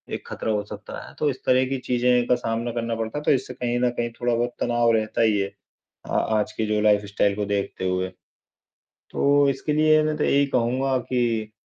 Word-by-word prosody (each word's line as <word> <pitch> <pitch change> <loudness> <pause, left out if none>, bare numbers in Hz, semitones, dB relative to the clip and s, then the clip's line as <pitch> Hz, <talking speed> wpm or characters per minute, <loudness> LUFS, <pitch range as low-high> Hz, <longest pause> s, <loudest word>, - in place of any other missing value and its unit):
एक - - -9
खतरा 110 - -3
हो 105 -1 0
सकता - - -8
है। - - -13
तो 150 - +2
इस 130 - -5
तरह 130 +1 +4
की 135 - -1
चीज़ें 125 0 +2
का 125 - +4
सामना 115 0 -2
करना 115 -1 -2
पड़ता 115 +4 -4
है 150 - -4
तो - - +3
इससे 130 -2 0
कहीं 120 -1 -2
न 125 0 +2
कहीं 120 -1 -2
थोड़ा-बहुत 120 0 0
तनाव 120 -1 +2
रहता 110 +1 -1
ही 110 -2 +3
है, 100 0 -2 0.6
आ - - 0
आज 110 -1 0
की 110 - -2
जो 105 0 0
लाइफस्टाइल 105 -1 +2
को 105 0 -2
देखते 100 -2 -2
हुए। 90 0 -1 1.0
तो 140 0 +3
इसके 135 +3 -2
लिए 155 0 +4
मैं 155 0 0
तो 150 - 0
यही 140 0 +3
कहूँगा 130 +1 +1
कि 120 -4 -1
120 Hz, 210 wpm, -24 LUFS, 110-130 Hz, 1.0 s, तरह